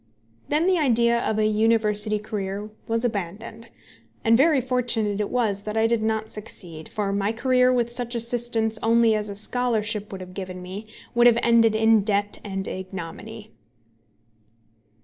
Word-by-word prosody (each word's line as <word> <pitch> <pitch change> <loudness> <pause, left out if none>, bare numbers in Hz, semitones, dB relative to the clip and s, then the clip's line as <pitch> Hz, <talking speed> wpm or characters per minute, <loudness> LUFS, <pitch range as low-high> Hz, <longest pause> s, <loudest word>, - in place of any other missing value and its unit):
Then 305 +3 +2
the 370 -2 +3
idea 235 -4 +3
of 220 -2 -1
a 215 - +2
university 215 -1 +2
career 205 0 -5 0.2
was 230 +1 0
abandoned. 215 +2 -5 0.5
And 225 -1 +4
very 285 +3 +4
fortunate 235 -5 0
it 205 - -2
was 215 -5 0
that 215 +1 -5
I 220 - +3
did 230 -1 +1
not 220 0 -2
succeed, 170 -6 -8
for 200 -2 -2
my 200 +1 0
career 250 +2 +2
with 240 -2 0
such 240 0 -3
assistance 230 -2 -1
only 230 0 +4
as 210 -1 -2
a 200 - -6
scholarship 215 -1 -1
would 190 -1 -7
have 185 0 -10
given 185 -1 -6
me, 190 +4 -8 0.3
would 240 0 +5
have 235 -1 +5
ended 230 -2 +4
in 220 0 +4
debt 205 0 -1
and 195 -2 -3
ignominy. 190 +4 -7
220 Hz, 160 wpm, -24 LUFS, 205-235 Hz, 0.5 s, would